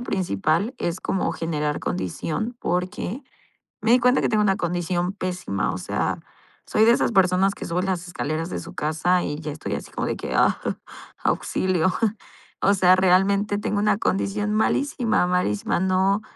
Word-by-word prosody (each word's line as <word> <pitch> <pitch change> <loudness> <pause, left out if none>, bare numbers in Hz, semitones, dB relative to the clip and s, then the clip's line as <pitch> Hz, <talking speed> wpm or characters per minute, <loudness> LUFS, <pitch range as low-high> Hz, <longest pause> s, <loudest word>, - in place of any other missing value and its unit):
principal 185 - 0
es 170 +1 -2
como 190 - -1
generar 150 -3 -2
condición, 155 - -3
porque 185 +8 -2 0.6
me 220 - 0
di 245 +2 +6
cuenta 250 +2 +3
que - - +1
tengo 215 -1 +2
una 195 -1 +2
condición 175 +1 -1
pésima. 180 - -2
O 90 - -5
sea, - - -2 0.5
soy 215 - +3
de 230 - +6
esas 235 - +2
personas 190 -1 +3
que - - -7
suben 180 +3 -1
las 180 -2 -2
escaleras 165 -1 -3
de - - -3
su - - -10
casa, 165 +4 +1
y 150 +1 -3
ya 155 -1 -5
estoy 155 - -5
así - - -5
como - - -3
de - - -1
que: - - -4
"Ah, - - +3 0.6
auxilio". 185 -1 +1 0.7
O 200 - +4
sea, 185 -1 +5
realmente 195 +3 +3
tengo 210 -1 -1
una 210 -1 +2
condición 205 +1 -1
malísima, 230 -1 +1
malísima. 180 - 0
No, 190 +2 +2
185 Hz, 165 wpm, -23 LUFS, 170-205 Hz, 0.7 s, di